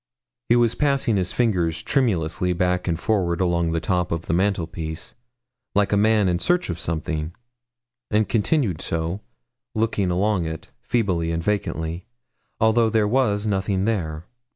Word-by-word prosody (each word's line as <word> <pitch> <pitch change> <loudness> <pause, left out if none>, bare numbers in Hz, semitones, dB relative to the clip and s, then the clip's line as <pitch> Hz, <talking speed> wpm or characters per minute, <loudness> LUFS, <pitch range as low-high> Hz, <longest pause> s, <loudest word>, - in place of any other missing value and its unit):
He 120 - +6
was 120 -1 +3
passing 140 -6 +1
his 90 -2 0
fingers 85 -9 0
tremulously 90 - +1
back 90 0 0
and 85 -2 0
forward 90 -6 0
along 85 -2 +1
the 80 - 0
top 90 +2 -1
of 85 0 -2
the 85 - -2
mantelpiece, 85 -4 -2 0.6
like 100 0 +2
a - - +5
man 105 -1 +3
in 90 -1 +1
search 175 - +1
of 85 - -5
something, 80 0 -3 0.7
and 105 0 +2
continued 110 - +1
so, 85 +4 -2 0.5
looking 110 -4 0
along 90 -1 +1
it, 80 -1 -7
feebly 90 -8 0
and 80 0 -2
vacantly, 85 -2 -2 0.5
although 110 +1 +4
there 110 -1 +2
was 105 -3 +1
nothing 95 -1 0
there. 85 -7 -2
95 Hz, 150 wpm, -23 LUFS, 85-110 Hz, 0.7 s, He